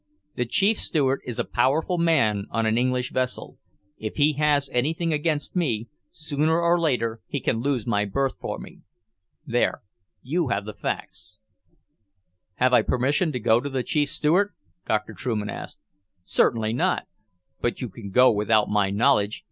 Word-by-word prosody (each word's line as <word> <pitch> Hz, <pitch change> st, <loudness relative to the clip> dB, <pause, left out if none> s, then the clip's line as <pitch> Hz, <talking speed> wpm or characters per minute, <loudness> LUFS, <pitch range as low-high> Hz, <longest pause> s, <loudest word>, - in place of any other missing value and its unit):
The 125 Hz, -, -1 dB
Chief 205 Hz, -, +2 dB
Steward 135 Hz, -4 st, +1 dB
is 120 Hz, -, -4 dB
a -, -, +1 dB
powerful 160 Hz, +6 st, +1 dB
man 115 Hz, -12 st, +2 dB
on 115 Hz, -1 st, -1 dB
an 110 Hz, 0 st, +2 dB
English 125 Hz, +1 st, 0 dB
vessel. 130 Hz, 0 st, -3 dB, 0.4 s
If 110 Hz, -1 st, -5 dB
he 150 Hz, +1 st, +3 dB
has 145 Hz, -1 st, +2 dB
anything 160 Hz, +6 st, 0 dB
against 150 Hz, +1 st, -1 dB
me, 120 Hz, -10 st, -1 dB, 0.2 s
sooner 155 Hz, +1 st, 0 dB
or 170 Hz, +1 st, +3 dB
later 115 Hz, -8 st, 0 dB
he 145 Hz, -, -3 dB
can 115 Hz, -, 0 dB
lose 130 Hz, -2 st, -1 dB
my 105 Hz, -3 st, +1 dB
berth 135 Hz, +7 st, -1 dB
for -, -, -4 dB
me. -, -, -11 dB, 0.7 s
There 120 Hz, -4 st, 0 dB, 0.4 s
you 160 Hz, +4 st, 0 dB
have 100 Hz, -4 st, -1 dB
the 105 Hz, -, -6 dB
facts." 90 Hz, -1 st, -6 dB, 1.2 s
"Have 125 Hz, +4 st, +2 dB
I -, -, +8 dB
your -, -, -1 dB
permission 140 Hz, +7 st, +1 dB
to 125 Hz, -, -3 dB
go 115 Hz, +1 st, +3 dB
to 145 Hz, -, -4 dB
the 130 Hz, -2 st, -2 dB
Chief 145 Hz, 0 st, 0 dB
Steward?" 180 Hz, +9 st, +1 dB, 0.3 s
Dr. 110 Hz, 0 st, -1 dB
Trueman 105 Hz, 0 st, -3 dB
asked. -, -, -7 dB, 0.5 s
"Certainly 110 Hz, +3 st, +1 dB
not. 120 Hz, -, +1 dB, 0.6 s
But 120 Hz, -, -1 dB
you 125 Hz, -, -3 dB
can 100 Hz, 0 st, -9 dB
go 125 Hz, +6 st, +6 dB
without 105 Hz, 0 st, +2 dB
my 105 Hz, -2 st, +2 dB
knowledge. 105 Hz, 0 st, +2 dB
125 Hz, 165 wpm, -24 LUFS, 110-150 Hz, 1.2 s, I